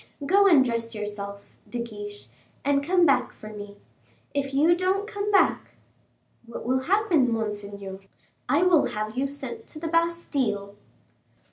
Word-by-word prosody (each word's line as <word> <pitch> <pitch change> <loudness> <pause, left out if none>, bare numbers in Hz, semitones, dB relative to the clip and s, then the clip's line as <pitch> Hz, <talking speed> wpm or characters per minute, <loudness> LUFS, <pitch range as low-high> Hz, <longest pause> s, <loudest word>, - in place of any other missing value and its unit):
Go 395 +6 +5
and 295 -8 +6
dress 230 -1 -2
yourself, 200 -1 -6 0.3
De 245 - -4
Guiche, 205 -3 -7 0.4
and 280 0 +2
come 355 +3 +4
back - - +2
for 215 - -11
me. 205 -1 -9 0.6
If 275 -1 -1
you 310 +5 +4
don't 375 +3 0
come 410 -1 -3
back 390 -2 +2 0.3
" - - -37
"What 235 - -7
will 260 +2 +2
happen, 335 - +2
monseigneur?" 205 -3 -4 0.5
"I 290 +6 +4
will 355 -4 +5
have 215 +1 -4
you 270 +2 0
sent 260 -5 -6
to 305 - -7
the 330 - -4
Bastile." 290 -12 0
260 Hz, 150 wpm, -26 LUFS, 210-335 Hz, 0.6 s, and